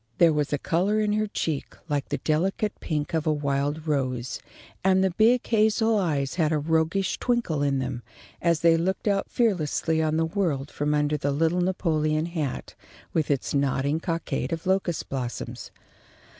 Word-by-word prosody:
There 170 -2 +5
was 150 -1 0
a 145 - +1
colour 185 +9 +1
in 210 -1 +1
her 215 0 +1
cheek 160 -7 -3
like 145 -3 -2
the - - -1
delicate 190 +7 0
pink 150 -1 -3
of 160 -1 0
a - - +4
wild 145 +1 -1
rose, 130 -5 -1 0.4
and 190 0 +4
the 190 - +2
big 225 +7 +3
hazel 220 0 +3
eyes 145 -7 0
had 155 -1 +2
a 155 - +2
roguish 160 +5 0
twinkle 235 - 0
in 140 -1 +1
them, 130 -2 -3 0.4
as 170 -2 +2
they 165 -1 +5
looked 190 +5 -1
out 200 -1 +1
fearlessly 165 -7 +1
on 155 0 +1
the 165 - +2
world 160 -6 -1
from 150 +1 0
under 150 0 +1
the 145 - -1
little 165 +5 +1
Napoleon 155 -4 0
hat 160 -6 -4 0.4
with 160 -3 0
its 140 -3 0
nodding 140 +2 +1
cockade 170 0 -2
of 165 -1 -3
locust 190 -3 0
blossoms. 125 -3 -5
160 Hz, 170 wpm, -26 LUFS, 145-185 Hz, 0.4 s, There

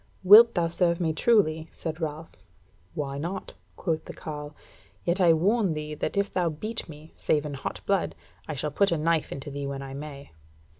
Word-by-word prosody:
"Wilt 220 +5 +9
thou 170 -2 +2
serve 170 0 +1
me 160 -3 0
truly?" 160 -5 +2
said 160 0 -5
Ralph. 155 +1 -4 0.6
"Why 140 -2 -3
not?" 175 +6 -5 0.2
quoth 160 -3 -2
the - - -8
carle: 150 -1 -7 0.5
"yet 180 +3 +1
I 175 -2 +6
warn 190 +2 +2
thee 150 0 -5
that 150 - -3
if 200 0 0
thou 180 -2 +1
beat 215 +7 -5
me, 155 +1 -12
save 150 -1 0
in 150 - -4
hot 140 - -5
blood, 195 -2 0 0.3
I 155 - -4
shall 150 +2 -2
put 200 +6 +2
a 170 - +2
knife 160 0 +1
into 140 +1 -6
thee 140 0 -4
when 140 0 -4
I 135 0 -7
may." 140 - -8
160 Hz, 195 wpm, -27 LUFS, 150-180 Hz, 0.6 s, Wilt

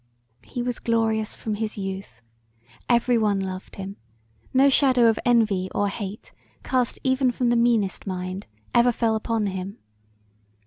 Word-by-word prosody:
He 245 -2 -5
was 245 -1 -2
glorious 225 -2 0
from 220 - -4
his 215 +1 -3
youth. 190 - -6 0.7
Every 240 0 +3
one 205 -2 +2
loved 190 -1 -5
him; 195 +1 -7 0.5
no 265 +2 +5
shadow 260 -3 +5
of 225 - +2
envy 215 -6 +2
or 205 0 +1
hate 200 0 -6 0.3
cast 255 -2 0
even 260 0 +2
from 245 0 0
the 240 - +3
meanest 230 -5 +1
mind 185 +1 -4 0.3
ever 240 +1 +5
fell 230 -1 +1
upon 220 0 -1
him. 190 +2 -4
220 Hz, 145 wpm, -24 LUFS, 195-240 Hz, 0.7 s, no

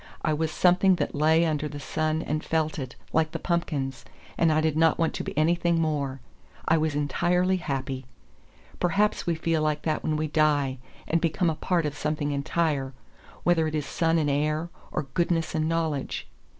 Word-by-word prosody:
I 155 - +2
was 160 +1 0
something 180 +3 +4
that - - -2
lay 160 +3 +4
under 155 -2 0
the 145 -1 -7
sun 155 +3 -1
and 155 +1 -2
felt 160 -1 -1
it, 130 -2 -6 0.2
like 160 0 +2
the - - -1
pumpkins, 145 -7 -2 0.3
and 165 -1 +3
I 155 - +3
did 155 -1 +1
not 160 0 +4
want 165 -1 +1
to - - -3
be - - -6
anything 170 +2 +2
more. 145 -4 -1 0.5
I 165 - +5
was 155 -2 0
entirely 180 +6 +1
happy. 135 -5 -3 0.7
Perhaps 200 +4 +1
we 170 - +2
feel 165 0 0
like 150 -1 0
that 155 -1 0
when 155 - -1
we 155 0 -1
die 145 -4 +2 0.3
and 165 0 +1
become 165 +1 +1
a - - -4
part 170 0 0
of 145 -1 -2
something 150 0 -1
entire, 140 -1 -1 0.5
whether 165 -2 +3
it 155 - -3
is 150 -2 -1
sun 165 0 +1
and 155 -2 +1
air, 150 +3 0 0.2
or - - -1
goodness 170 -2 0
and 155 0 0
knowledge. 160 -4 -2
155 Hz, 190 wpm, -26 LUFS, 150-165 Hz, 0.7 s, I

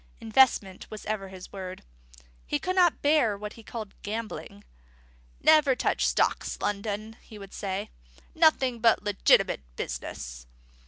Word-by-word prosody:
Investment 220 -4 +2
was 215 - -9
ever 210 -2 -3
his 185 -1 -11
word. 185 -1 -7 0.6
He - - 0
could 370 - -2
not 355 -3 +3
bear 285 -8 +3
what 210 +1 -7
he 230 - -13
called 220 -2 -7
gambling. 215 - -6 0.8
"Never 305 -4 +5
touch - - +1
stocks, - - 0
Loudon," 210 +2 -3
he 220 - -13
would 195 -1 -11
say; 195 0 -4 0.4
"nothing 270 -7 +3
but 230 -1 +4
legitimate 205 - +3
business." - - -6
215 Hz, 130 wpm, -27 LUFS, 195-240 Hz, 0.8 s, Never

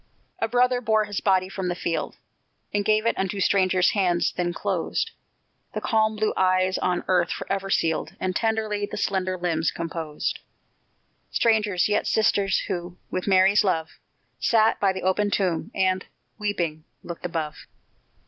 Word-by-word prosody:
A - - +1
brother 245 +1 +2
bore 220 -2 +2
his 205 -2 -4
body 190 -2 +2
from 190 -1 -4
the 175 - -1
field, 170 -1 -2 0.6
And 205 0 +1
gave 215 +1 +2
it 230 - +2
unto 195 +1 -1
strangers' 185 -2 +3
hands, 180 -4 +1
that 175 -1 -1
closed 455 - -1 0.6
The - - 0
calm 220 -1 +1
blue 215 0 0
eyes 185 0 +2
on 180 -1 0
earth 180 -2 +2
forever 195 0 -3
sealed, 165 -4 0
And 185 -1 -2
tenderly 220 -2 0
the - - -6
slender 185 -1 -1
limbs 170 -2 0
composed: 165 -2 -4 0.9
Strangers, 210 -5 +2
yet 210 - 0
sisters, 200 -3 +2
who, 175 -2 -4
with 185 +1 -3
Mary's 195 +2 +5
love, 165 -5 -1 0.4
Sat 225 -1 +3
by 195 -1 +3
the 190 0 -6
open 195 +3 +1
tomb, 185 -5 0
and, 185 -1 +1 0.4
weeping, 170 -7 -2 0.2
looked 170 0 -5
above. 160 -3 -5
190 Hz, 150 wpm, -25 LUFS, 180-210 Hz, 0.9 s, Mary's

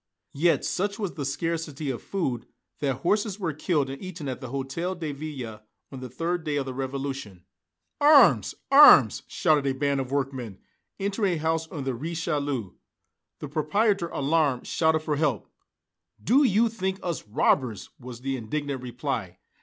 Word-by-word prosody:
Yet 165 +4 +2
such 200 +2 -1
was 200 -5 -3
the 145 - -4
scarcity 155 -1 -2
of 120 - -6
food 135 - -3 0.3
that 135 -3 0
horses 205 +2 +1
were 170 -5 -2
killed 150 -2 0
and 135 +1 -7
eaten 180 -5 -7
at 130 0 -4
the 130 - -6
Hôtel 140 +8 -3
de 155 -3 -3
Ville, 135 -7 -7 0.3
on 135 - -7
the 130 0 -7
third 165 +7 -2
day 150 -2 -2
of 140 -2 -1
the 130 - -5
Revolution. 135 -7 -5 0.6
"Arms 290 0 +6 0.2
arms!" 275 - +8
shouted 150 -3 +2
a 135 - 0
band 140 0 +1
of 130 0 -6
workmen, 130 -7 -3 0.4
entering 200 -1 0
a - - -2
house 160 +1 -1
on 150 -3 -6
the 135 -1 -2
Rue 140 +8 -5
Richelieu. 145 - -2 0.7
The 150 - -4
proprietor, 170 +6 +1
alarmed, 145 -4 0
shouted 160 -1 +1
for 150 -2 -2
help. 140 - 0 0.7
"Do 270 +6 +4
you 230 -2 +4
think 190 -4 -3
us 170 -11 -4
robbers?" 115 +1 +1
was 125 -1 -9
the 135 0 -2
indignant 140 +3 -3
reply. 120 -7 -4
145 Hz, 165 wpm, -26 LUFS, 130-170 Hz, 0.7 s, arms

